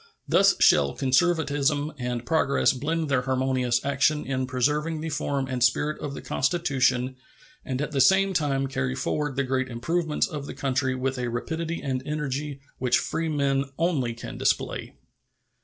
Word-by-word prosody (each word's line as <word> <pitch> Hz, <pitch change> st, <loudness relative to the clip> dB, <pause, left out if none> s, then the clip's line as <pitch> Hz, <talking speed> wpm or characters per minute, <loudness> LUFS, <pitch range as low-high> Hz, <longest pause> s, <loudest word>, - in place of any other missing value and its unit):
Thus -, -, +5 dB
shall 70 Hz, -1 st, +5 dB
conservatism 145 Hz, 0 st, +1 dB
and 125 Hz, -1 st, -3 dB
progress 140 Hz, -2 st, +2 dB
blend 160 Hz, +5 st, -2 dB
their 130 Hz, -3 st, +2 dB
harmonious 130 Hz, -2 st, 0 dB
action 140 Hz, +2 st, +1 dB
in 130 Hz, -1 st, -2 dB
preserving 150 Hz, +5 st, 0 dB
the 160 Hz, +1 st, -4 dB
form 140 Hz, -2 st, -1 dB
and 130 Hz, -2 st, -1 dB
spirit 145 Hz, +4 st, +1 dB
of 140 Hz, -1 st, -4 dB
the -, -, -8 dB
Constitution 130 Hz, -5 st, +1 dB, 0.5 s
and 130 Hz, -2 st, -3 dB
at 150 Hz, -, -4 dB
the 140 Hz, -2 st, +1 dB
same 195 Hz, +7 st, +4 dB
time 140 Hz, -5 st, +1 dB
carry 65 Hz, -, -2 dB
forward 150 Hz, -, -2 dB
the 140 Hz, -, +1 dB
great 130 Hz, 0 st, -1 dB
improvements 160 Hz, +6 st, 0 dB
of 150 Hz, -6 st, -6 dB
the -, -, -7 dB
country 130 Hz, -1 st, 0 dB
with 130 Hz, 0 st, -2 dB
a 125 Hz, -, -1 dB
rapidity 160 Hz, +8 st, -3 dB
and 130 Hz, -2 st, -1 dB
energy 150 Hz, -1 st, -3 dB, 0.2 s
which 125 Hz, -1 st, +3 dB
freemen 140 Hz, -4 st, 0 dB
only 140 Hz, -9 st, 0 dB
can -, -, -8 dB
display. -, -, -1 dB
135 Hz, 155 wpm, -26 LUFS, 130-150 Hz, 0.5 s, Thus